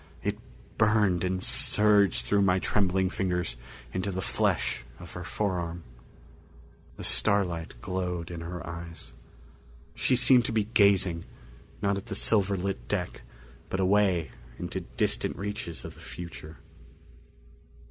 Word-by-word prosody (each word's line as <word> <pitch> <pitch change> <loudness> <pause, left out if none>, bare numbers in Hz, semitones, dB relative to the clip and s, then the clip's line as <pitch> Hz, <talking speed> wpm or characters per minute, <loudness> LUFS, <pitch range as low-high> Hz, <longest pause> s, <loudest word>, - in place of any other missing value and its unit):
It - - -1 0.4
burned 105 -5 +3
and 95 0 -1
surged 105 -2 +4
through 100 -1 +3
my 95 -2 +4
trembling 95 -1 +1
fingers 90 -9 -1 0.4
into 95 +2 -1
the 95 - -3
flesh 95 - 0 0.2
of 85 -1 -10
her 90 - -6
forearm. 85 -3 -2 1.1
The - - -7
starlight 85 -9 +1
glowed 90 -2 -3
in 85 -1 -6
her 85 +1 -6
eyes. 85 -1 -8 0.8
She 130 - +2
seemed 125 -1 +6
to - - -1
be 110 -1 +2
gazing, 100 -5 +3 0.6
not 100 0 +2
at 100 - -7
the 100 - -4
silver 100 -2 +2
lit 95 +1 -3
deck, 90 -4 -2 0.5
but 95 - -2
away 95 -6 +3 0.3
into - - -4
distant - - -1
reaches 100 -4 -4
of - - -7
the - - -17
future. 85 -2 -8
95 Hz, 130 wpm, -28 LUFS, 85-100 Hz, 1.1 s, seemed